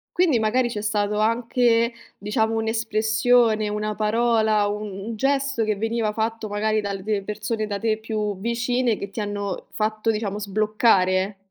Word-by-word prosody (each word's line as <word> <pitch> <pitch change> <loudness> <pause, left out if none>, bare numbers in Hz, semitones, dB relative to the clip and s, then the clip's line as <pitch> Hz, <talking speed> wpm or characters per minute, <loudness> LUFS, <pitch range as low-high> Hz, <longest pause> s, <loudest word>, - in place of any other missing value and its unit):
quindi 345 -8 +3
magari 235 +3 +1
c'è 210 -3 -4
stato 210 -1 0
anche, 230 +1 +2 0.3
diciamo, 220 +2 0
un'espressione, 220 0 +2
una 210 0 -2
parola, 220 -1 +2
un 210 0 -4 0.2
un - - -6
gesto 275 0 0
che 215 -1 0
veniva 225 +1 -1
fatto, 225 0 -2
magari, 215 +1 0
dalle 200 0 -2
persone 215 +2 -3
da 205 -1 -4
te 220 0 0
più 215 -3 -3
vicine, 235 +2 0
che 200 - -6
ti 200 - -7
hanno 205 -1 -4
fatto, 215 +1 0
diciamo, 210 -2 -3
sbloccare. 200 -2 +2
215 Hz, 145 wpm, -23 LUFS, 210-230 Hz, 0.3 s, quindi